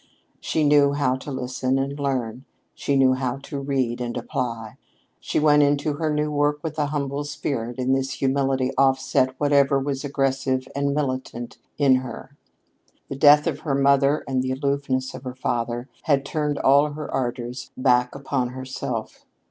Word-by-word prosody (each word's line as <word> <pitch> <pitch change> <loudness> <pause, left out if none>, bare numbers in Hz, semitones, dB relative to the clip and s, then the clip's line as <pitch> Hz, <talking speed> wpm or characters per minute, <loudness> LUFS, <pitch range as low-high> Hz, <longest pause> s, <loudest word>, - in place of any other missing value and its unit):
She 160 - -1
knew 145 -1 +5
how 140 -3 +1
to 145 - -8
listen 130 0 -1
and 135 +1 -2
to 145 - -8
learn; 130 -3 -2 0.3
she 140 - -1
knew 130 -1 +5
how 130 0 -2
to 140 - -5
read 130 -3 -1
and 120 0 -3
apply. 115 -2 -4 0.4
She - - -1
went 150 -1 +5
into 145 +1 +2
her 155 -1 0
new 150 0 0
work 145 0 +1
with 155 -1 -4
a 145 - +1
humble 140 -1 -2
spirit, 140 -5 -4
and 130 +1 +1
this 135 0 -2
humility 135 -1 0
offset 130 -1 +2
whatever 140 -1 +3
was 135 0 -3
aggressive 135 -2 -1
and 140 0 0
militant 130 -4 -3 0.2
in 135 -3 +5
her. 130 +2 -8 0.7
The - - -4
death 145 +1 +6
of 150 -4 -1
her 145 -4 -1
mother 140 +1 +3
and 130 -1 0
the 130 0 -1
aloofness 135 -1 -1
of - - -8
her 125 -1 -6
father 120 -1 -2 0.2
had 140 -3 +2
turned 150 -1 -1
all 140 +2 +4
her 150 0 -6
ardors 120 -1 -3
back 125 -1 +2
upon 135 -2 -1
herself. 130 -2 -6
135 Hz, 170 wpm, -23 LUFS, 130-145 Hz, 0.7 s, death